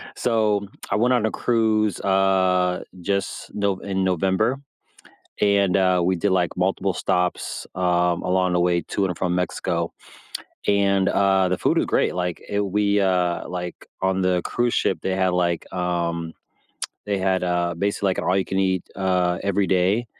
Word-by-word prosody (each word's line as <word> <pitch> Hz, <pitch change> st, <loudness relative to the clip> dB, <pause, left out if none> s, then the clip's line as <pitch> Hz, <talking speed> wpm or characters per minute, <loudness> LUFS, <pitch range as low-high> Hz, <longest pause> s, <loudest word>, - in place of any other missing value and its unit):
So, 105 Hz, -4 st, +1 dB, 0.2 s
I -, -, +2 dB
went 120 Hz, +4 st, +3 dB
on 120 Hz, -3 st, +2 dB
a -, -, -3 dB
cruise, 110 Hz, -4 st, +1 dB
uh, 95 Hz, -2 st, +2 dB, 0.2 s
just 100 Hz, +2 st, -3 dB
No 100 Hz, -2 st, 0 dB
in 95 Hz, -1 st, -2 dB
November, 95 Hz, +7 st, +1 dB, 0.9 s
and, 100 Hz, -2 st, +3 dB
uh, 95 Hz, -2 st, +3 dB
we 95 Hz, 0 st, +1 dB
did, 100 Hz, +4 st, 0 dB
like, 90 Hz, -2 st, +1 dB
multiple 95 Hz, +1 st, 0 dB
stops, 90 Hz, 0 st, -1 dB
um, 90 Hz, -1 st, +1 dB
along 90 Hz, 0 st, +1 dB
the 90 Hz, -, +2 dB
way 85 Hz, 0 st, +2 dB
to 100 Hz, -, -2 dB
and 90 Hz, -3 st, -3 dB
from 90 Hz, -1 st, 0 dB
Mexico, 90 Hz, -1 st, -2 dB, 0.7 s
and, 100 Hz, -1 st, +3 dB
uh, 95 Hz, -2 st, +3 dB
the 90 Hz, -, 0 dB
food -, -, +1 dB
was -, -, +1 dB
great, -, -, +1 dB
like, 90 Hz, -1 st, -2 dB
it 100 Hz, -, 0 dB
We, 100 Hz, +1 st, +1 dB
uh, 90 Hz, -2 st, 0 dB
like, 90 Hz, -1 st, -6 dB, 0.2 s
on 95 Hz, 0 st, +1 dB
the 90 Hz, -1 st, +1 dB
cruise 120 Hz, +5 st, -1 dB
ship, -, -, +1 dB
they 95 Hz, -, -1 dB
had, 95 Hz, -1 st, +1 dB
like, 85 Hz, -2 st, -1 dB
um 85 Hz, -2 st, -2 dB, 0.7 s
they 100 Hz, -1 st, -1 dB
had, 95 Hz, -1 st, 0 dB
uh, 85 Hz, -1 st, 0 dB
basically 100 Hz, +1 st, 0 dB
like 95 Hz, -, -1 dB
an -, -, -3 dB
all-you-can-eat, 95 Hz, 0 st, +1 dB
uh, 90 Hz, -2 st, +1 dB
every 100 Hz, 0 st, +1 dB
day, 95 Hz, +6 st, +2 dB
95 Hz, 165 wpm, -23 LUFS, 90-100 Hz, 0.9 s, went